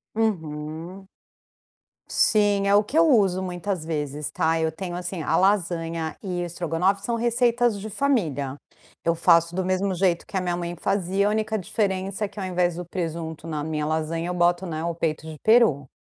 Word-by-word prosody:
Uhum. 165 -2 -3 1.0
Sim, 205 -2 +3
é 200 - +5
o 210 - +5
que 280 +10 -3
eu 330 0 +6
uso 195 -8 +3
muitas 180 -2 -3
vezes 150 -2 -3
tá, 160 0 +1
eu 160 0 +1
tenho 175 +1 -6
assim, 180 -1 -4
a - - +1
lasanha 170 -4 0
e 180 -3 -3
o - - -2
estrogonofe 175 +3 0
são 235 - 0
receitas 235 -1 +2
de 215 +2 -6
família. 165 - 0 0.5
Eu 170 0 +2
faço 170 0 +4
do 190 - 0
mesmo 185 +1 0
jeito 175 -1 +1
que - - -11
a 185 - +1
minha 175 -1 -1
mãe 175 0 -4
fazia, 195 +2 0
a - - +3
única 220 0 0
diferença 195 +1 -1
é - - -3
que, 205 +1 -11
ao 190 - -3
invés 180 -2 0
do 175 0 -5
presunto 165 -2 -5
na 150 -2 -3
minha 155 -1 -2
lasanha, 160 +2 -1
eu - - -1
boto, 175 +1 +2
né, 160 -1 -4
o 170 0 -1
peito 160 -1 -2
de 155 -1 -8
peru, 220 - +4
180 Hz, 190 wpm, -24 LUFS, 165-200 Hz, 1.0 s, eu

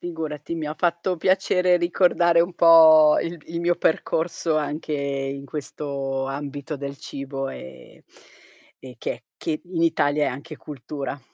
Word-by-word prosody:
Figurati, 160 -2 -5
mi 160 -2 -4
ha 150 - -4
fatto 175 +2 0
piacere 180 0 +2
ricordare 175 -1 +3
un 175 +1 0
po' 160 -3 +7
il 170 +1 -4
il 170 +1 -4
mio 175 0 +2
percorso 160 0 0
anche 150 +1 -3
in 140 -1 -3
questo 140 -1 -4
ambito 140 +2 -5
del 140 0 -6
cibo, 135 0 -6
e 65 - -11 0.7
e 130 -1 -11
che 120 - -5
che 155 -2 -3
in 175 -2 -3
Italia 150 -3 +2
è - - +2
anche 145 +5 -8
cultura. 145 0 -7
150 Hz, 145 wpm, -23 LUFS, 140-170 Hz, 0.7 s, po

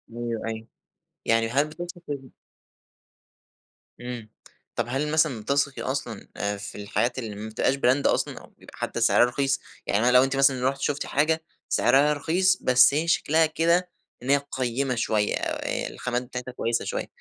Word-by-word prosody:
أيوه، 120 -2 -3
أيوه، 110 0 -5 0.6
يعني 115 0 +3
هل 140 +5 +2
بتثقي 175 +2 -8
في 135 -3 -5 1.7
إمم، 120 -3 -6 0.5
طب 120 - 0
هل 145 +4 -1
مثلًا 155 -8 +2
بتثقي 140 +3 0
أصلًا 125 -5 -4
آآ، 100 0 -2
في 100 - -8
الحاجات 120 +5 -1
اللي 110 -4 -5
ما 110 +2 -6
بتبقاش 110 +4 +1
brand 135 +1 +2
أصلًا، - - 0
أو - - -15
بيبقى - - -15
حتى - - -3
سعرها - - +5
رخيص، 135 +3 0 0.3
يعني 105 +3 +2
أنا 125 - +4
لو 125 +1 +7
أنتِ 135 0 0
مثلًا 135 -1 +3
رُحتِ 135 0 -6
شفتِ 145 0 -1
حاجة 160 +3 +1 0.3
سعرها 145 +2 +4
رخيص 185 +6 +2
بس 125 +1 +6
هي 160 +3 0
شكلها 160 -1 +3
كده 170 +3 +1 0.3
إن 130 - -5
هي 140 0 +4
قيّمة 130 0 -1
شوية، 110 -3 +1
آآ، - - -2
الخامات 125 0 -3
بتاعتها 125 0 -6
كويسة 115 -1 -1
شوية، - - -3
130 Hz, 165 wpm, -25 LUFS, 120-145 Hz, 1.7 s, لو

